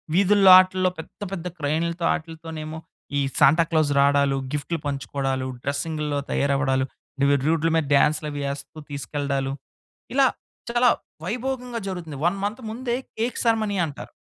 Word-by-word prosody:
వీధుల్లో 195 0 +6
వాటిల్లో 185 0 +3
పెద్ద, 160 - -10
పెద్ద 180 -2 -5
క్రైన్‌‌లతో 165 +3 -1
ఆటులతోనేమో 160 -1 -6 0.4
ఈ - - +2 0.2
సాంటా 150 +3 +6
క్లాస్ 155 -3 +2
రావడాలు, 140 -1 +3 0.2
గిఫ్ట్‌లు 150 +3 -2
పంచుకోవడాలు 135 -1 -2 0.2
డ్రెసింగ్‌లో 145 +1 -2
తయారవ్వడాలు, 135 -1 +1 0.6
రోడ్‌ల 165 0 +2
మీద 160 -2 +2
డాన్సులవి 150 0 +1
ఏస్తూ 140 +2 -8
తీసుకెళ్ళడాలు. 140 -1 -2 0.6
ఇలా 270 0 +5 0.4
చాలా 240 +1 +4 0.4
వైభోగంగా 250 +3 -3
జరుగుతుంది. 165 -6 -5
1 195 +3 0
మంత్ 215 +5 -2
ముందే 240 +2 -2 0.2
కేక్ 235 +3 -1
సరమనీ 220 -3 +1
అంటారు. 145 -4 -8
160 Hz, 120 wpm, -24 LUFS, 140-195 Hz, 0.6 s, వీధుల్లో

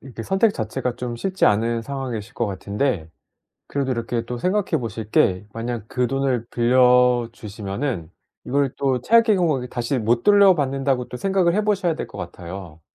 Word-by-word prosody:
이렇게 125 -4 -9
선택 195 +3 +2
자체가 115 - -3
좀 125 -1 -4
쉽지 190 +10 0
않은 115 +3 +2
상황이실 125 -4 -5
것 120 - -1
같은데 100 - -2 0.6
그래도 140 -2 -1
이렇게 115 -1 -2
또 125 +1 -5
생각해 185 +3 0
보실 110 -1 -5
게 95 0 +2
만약 115 -1 -4
그 125 -1 0
돈을 135 -3 0
빌려 125 0 +4
주시면은 105 - -5 0.3
이걸 140 0 0
또 130 -3 +1
최악의 225 - +4
경우에는 140 -8 0
다시 120 +2 -2
못 120 +1 +1
돌려 200 -2 +6
받는다고 135 -3 -1
또 - - -8
생각을 190 +3 +1
해 210 - +1
보셔야 195 -6 +1
될 - - -4
것 - - -12
같아요. 85 -2 -8
125 Hz, 355 characters per minute, -22 LUFS, 115-140 Hz, 0.6 s, 돌려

